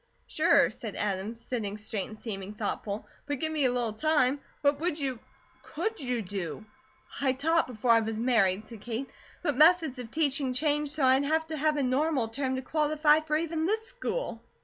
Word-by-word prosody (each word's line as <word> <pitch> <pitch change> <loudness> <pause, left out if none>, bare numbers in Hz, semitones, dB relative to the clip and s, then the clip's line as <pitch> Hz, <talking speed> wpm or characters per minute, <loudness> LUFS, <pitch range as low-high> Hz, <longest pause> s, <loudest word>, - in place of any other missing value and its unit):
"Sure," - - +4
said - - -6
Adam, 205 +2 -2
sitting 230 -3 -4
straight 210 -2 -2
and 215 - -10
seeming 205 -2 -6
thoughtful, 210 0 -3 0.2
"but 290 -1 -1
give 315 -1 0
me 300 -3 +1
a 250 - +3
little 240 -3 0
time. 290 +1 +2 0.2
What 285 0 +2
would 335 -1 -1
you 265 -5 -2 0.4
could 445 -1 -3
you, 250 -5 -2
do?" 195 +1 -5 0.6
"I 265 -2 +3
taught 325 +5 +2
before 240 -1 0
I 230 - +7
was 220 0 -3
married," 215 -5 +2
said 220 -2 -11
Kate; 240 +4 -4 0.3
"but 295 -6 +1
methods 315 -2 +5
of 240 -2 -6
teaching 275 -3 0
change 295 +2 +1
so 295 -2 0
I'd 260 +2 +4
have 320 +2 +1
to 315 - -3
have 305 0 +1
a 285 - +1
Normal 265 -1 +1
term 260 +3 -2
to 260 - -4
qualify 300 +1 +3
for 305 -1 0
even 325 0 -1
this 440 +2 0
school. - - -4
265 Hz, 195 wpm, -29 LUFS, 225-310 Hz, 0.6 s, I